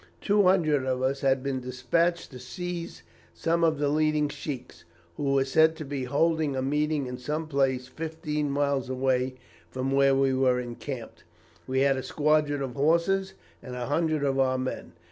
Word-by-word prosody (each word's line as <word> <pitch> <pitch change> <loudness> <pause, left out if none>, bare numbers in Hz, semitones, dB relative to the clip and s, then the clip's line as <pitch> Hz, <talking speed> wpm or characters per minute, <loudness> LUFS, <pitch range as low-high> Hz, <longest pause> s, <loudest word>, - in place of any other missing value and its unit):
Two 205 0 +3
hundred 165 -7 +3
of 130 0 -1
us 135 +1 0
had 135 -1 +2
been 135 -1 -1
despatched 140 +8 -1
to 125 - -9
seize 175 +6 -6 0.3
some 170 +1 0
of 160 -2 +3
the 145 0 0
leading 150 0 +2
sheiks, 135 -5 -7 0.3
who 140 -1 0
were 135 -1 +3
said 160 +4 +4
to 155 - -7
be 135 -2 -3
holding 155 +2 +1
a 130 - -1
meeting 150 +1 0
in 125 0 -6
some 150 +5 -3
place 135 -3 0
fifteen 155 +1 -3
miles 140 -2 0
away 130 0 0 0.3
from 130 +1 -3
where 135 0 +4
we 135 0 +2
were 130 -1 +2
encamped. 120 +1 -7 0.4
We 130 +1 +1
had 135 -1 +3
a - - -2
squadron 150 -1 +1
of 130 -2 -4
horse 170 +7 +1 0.3
and 125 -1 -8
a 125 -1 -3
hundred 155 +1 0
of 135 -1 +1
our 130 -1 +2
men. 130 0 -4
140 Hz, 180 wpm, -27 LUFS, 130-155 Hz, 0.4 s, said